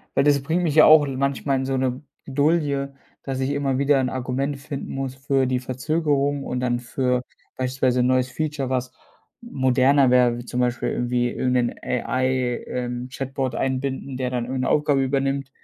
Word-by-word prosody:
weil -, -, +3 dB
das 140 Hz, -2 st, +3 dB
bringt 165 Hz, +5 st, 0 dB
mich 155 Hz, -4 st, 0 dB
ja 155 Hz, -, +8 dB
auch 155 Hz, -1 st, +7 dB
in 135 Hz, -2 st, -4 dB
manchmal 140 Hz, 0 st, 0 dB
in 130 Hz, -, -2 dB
so 135 Hz, 0 st, -1 dB
'ne 130 Hz, 0 st, -1 dB, 0.3 s
Bredouille, 140 Hz, -1 st, 0 dB, 0.3 s
dass 135 Hz, -1 st, -4 dB
ich 135 Hz, +1 st, 0 dB
immer 140 Hz, -2 st, 0 dB
wieder 140 Hz, +1 st, +3 dB
'n 130 Hz, -, -1 dB
Argument 130 Hz, +2 st, -2 dB
finden 140 Hz, -1 st, -6 dB
muss 135 Hz, -1 st, -4 dB
für 135 Hz, 0 st, 0 dB
die 130 Hz, -1 st, 0 dB
Verzögerung 140 Hz, +2 st, -1 dB
und 125 Hz, -, -3 dB
dann 120 Hz, -1 st, 0 dB
für 125 Hz, 0 st, -1 dB, 0.4 s
beispielsweise 130 Hz, -1 st, +1 dB
'n 125 Hz, -, +2 dB
neues 130 Hz, 0 st, +2 dB
Feature, 150 Hz, -4 st, -3 dB
was 130 Hz, -1 st, -2 dB, 0.5 s
moderner 135 Hz, -, +3 dB
wäre, 125 Hz, -1 st, +4 dB
wie 120 Hz, -, -7 dB
zum 125 Hz, -, -4 dB
Beispiel 125 Hz, 0 st, 0 dB
irgendwie 120 Hz, 0 st, 0 dB
irgend 125 Hz, -1 st, -1 dB
'nen 120 Hz, -1 st, +1 dB
AI 130 Hz, 0 st, -1 dB
ähm, 125 Hz, 0 st, -4 dB
Chatbot 135 Hz, -1 st, -3 dB
einbinden, 135 Hz, 0 st, -2 dB
der 125 Hz, -1 st, -1 dB
dann 120 Hz, -1 st, -1 dB
irgend 130 Hz, +1 st, -3 dB
'ne -, -, 0 dB
Aufgabe 145 Hz, -2 st, +2 dB
übernimmt, 135 Hz, 0 st, -1 dB
130 Hz, 190 wpm, -23 LUFS, 125-140 Hz, 0.5 s, ja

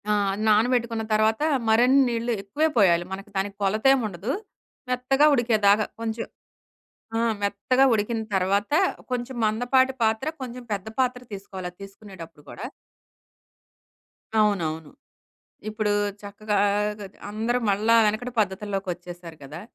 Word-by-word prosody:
ఆ! -, -, +3 dB, 0.3 s
నానబెట్టుకున్న 230 Hz, +1 st, +2 dB
తర్వాత 220 Hz, +2 st, +2 dB, 0.3 s
మరన్ని 250 Hz, +5 st, +5 dB
నీళ్ళు 235 Hz, 0 st, -2 dB
ఎక్కువే 285 Hz, +11 st, 0 dB
పొయ్యాలి. 175 Hz, -5 st, +4 dB
మనకి 195 Hz, +2 st, -7 dB
దానికి 195 Hz, +1 st, -2 dB
కొలతేముండదు, 215 Hz, -1 st, +1 dB, 0.6 s
మెత్తగా 255 Hz, +3 st, +2 dB
ఉడికేదాకా 215 Hz, -4 st, +3 dB
కొంచెం. 230 Hz, 0 st, -3 dB, 0.9 s
ఆ! -, -, +1 dB, 0.2 s
మెత్తగా 205 Hz, +6 st, +2 dB
ఉడికిన 225 Hz, +2 st, -1 dB
తర్వాత, 195 Hz, +4 st, +1 dB, 0.4 s
కొంచెం 250 Hz, +1 st, -3 dB
మందపాటి 245 Hz, +4 st, +2 dB
పాత్ర, 220 Hz, +4 st, +1 dB, 0.2 s
కొంచెం 250 Hz, 0 st, -7 dB
పెద్ద 195 Hz, 0 st, -6 dB
పాత్ర 250 Hz, -1 st, 0 dB
తీసుకోవాలది 190 Hz, -2 st, -7 dB
తీసుకునేటప్పుడు 190 Hz, -6 st, -12 dB
కూడా. 215 Hz, -, -7 dB, 1.7 s
అవునవును. 160 Hz, -7 st, 0 dB, 0.8 s
ఇప్పుడూ 215 Hz, -1 st, -1 dB, 0.3 s
చక్కగా, 205 Hz, +1 st, -3 dB, 0.4 s
గది 195 Hz, -1 st, -10 dB
అందరూ 225 Hz, +4 st, -1 dB
మళ్ళా 215 Hz, +3 st, +2 dB
వెనకటి 230 Hz, +4 st, -2 dB
పద్ధతుల్లోకొచ్చేశారు 185 Hz, -4 st, -4 dB
కదా! 150 Hz, +5 st, -8 dB
215 Hz, 105 wpm, -25 LUFS, 195-240 Hz, 1.7 s, మరన్ని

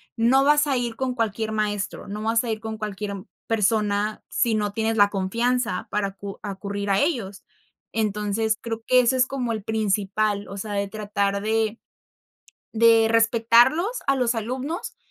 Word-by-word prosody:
no 250 Hz, +4 st, +4 dB
vas 295 Hz, +1 st, +4 dB
a 275 Hz, -2 st, +1 dB
ir 240 Hz, -2 st, -2 dB
con 255 Hz, +1 st, -2 dB
cualquier 220 Hz, -1 st, -1 dB
maestro, 205 Hz, -2 st, -2 dB
no 210 Hz, +1 st, -5 dB
vas 225 Hz, +2 st, +2 dB
a 235 Hz, -, -2 dB
ir 220 Hz, -, -3 dB
con 220 Hz, 0 st, -6 dB
cualquier 205 Hz, -2 st, -5 dB, 0.2 s
persona 210 Hz, -1 st, 0 dB
sí 230 Hz, -3 st, +1 dB
no 210 Hz, -1 st, -1 dB
tienes 225 Hz, +1 st, -1 dB
la 205 Hz, -1 st, +6 dB
confianza 230 Hz, +5 st, -1 dB
para 205 Hz, -1 st, 0 dB
acu 195 Hz, 0 st, -9 dB
acudir 200 Hz, 0 st, -4 dB
a 195 Hz, 0 st, +3 dB
ellos. 230 Hz, -, -1 dB, 0.5 s
Entonces, 215 Hz, 0 st, 0 dB
creo 225 Hz, -1 st, -5 dB
que 255 Hz, -, +5 dB
ese 250 Hz, +1 st, +3 dB
es 255 Hz, -, +4 dB
como 255 Hz, -3 st, -3 dB
el 215 Hz, -2 st, -5 dB
principal, 205 Hz, -1 st, 0 dB
o 200 Hz, -, -8 dB
sea, 205 Hz, +1 st, -5 dB
de 200 Hz, 0 st, -1 dB
tratar 200 Hz, -1 st, -2 dB
de 220 Hz, +1 st, 0 dB, 0.9 s
de 225 Hz, 0 st, +5 dB
respetarlos 235 Hz, -, +4 dB
a 275 Hz, -, +3 dB
los 245 Hz, -2 st, +1 dB
alumnos, 255 Hz, -, -4 dB
220 Hz, 165 wpm, -24 LUFS, 205-235 Hz, 0.9 s, la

